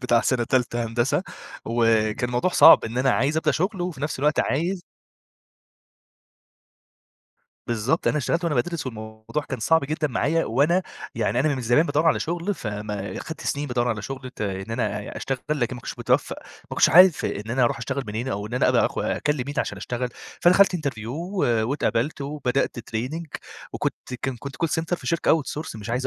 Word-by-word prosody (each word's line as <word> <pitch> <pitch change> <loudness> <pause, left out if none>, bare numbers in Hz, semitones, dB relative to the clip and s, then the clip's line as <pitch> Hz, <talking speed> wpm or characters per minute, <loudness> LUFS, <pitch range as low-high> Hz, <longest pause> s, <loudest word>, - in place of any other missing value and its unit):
بتاع 120 -2 +3
سنة 125 -1 +1
تالتة 120 -1 0
هندسة، 120 +3 0 0.4
وكان 115 0 +1
الموضوع 125 +9 0
صعب 160 -2 +8
إن 115 +2 -3
أنا 135 +1 +3
عايز 140 +5 +1
أبدأ 160 - +2
شغل، 185 +3 -1
وفي 175 -6 -4
نفس 150 -1 -2
الوقت 150 +2 +2
عايز 175 +6 -1 2.8
بالضبط 120 +7 0
أنا 150 - +1
اشتغلت 165 +5 -1
وأنا 165 -3 0
بادرس 165 +4 -1
والموضوع 110 +4 -5
كان 130 -4 -4
صعب 160 +6 +3
جدًا 155 +2 -1
معايا 155 +6 +1
وأنا، 150 +10 +2 0.3
يعني 115 +2 0
أنا 150 +1 +2
من 130 - -4
زمان 120 +8 +3
بادوّر 150 +2 +1
على 165 - +3
شغل، 175 +5 -2
فما 105 - -5
خدت 160 - -7
سنين 145 +1 -2
بادوّر 125 -2 0
على 110 -3 -2
شغل 130 +1 -6
ت - - -16
إن 95 +1 -4
أنا 115 -3 -1
أ - - -8
أشتغل 135 -1 -2
لكن 130 -5 0
ما - - -9
كنتش - - -6
متوفق، - - +1
ما - - -18 0.3
كنتش - - +6
عارف 180 -1 +7
إن 105 +3 -3
أنا 125 +2 +1
أروح 120 - 0
أشتغل 135 +3 -3
منين 110 +5 -3
أو 105 -4 -3
إن 115 - -6
أنا 125 - +3
أبقى - - +4
أخ - - -6
أكلم 150 -3 0
مين 145 - -5
عشان - - -1
أشتغل. 125 +1 -3 0.3
فدخلت 180 +1 +5
Interview 135 -9 -4
و 175 +9 -3 0.3
واتقبلت 145 0 0
وبدأت 140 -3 -1
Training 120 +8 -4 0.5
وكنت 125 - -4
كان 135 -2 -2
كنت 140 +3 -8
Call - - +1
center 165 +3 -1
في - - -12
شركة 165 -2 +2
Out - - -20
source 150 -4 -5
مش 110 +1 -7
عايز 125 +3 -1
130 Hz, 190 wpm, -24 LUFS, 115-155 Hz, 2.8 s, صعب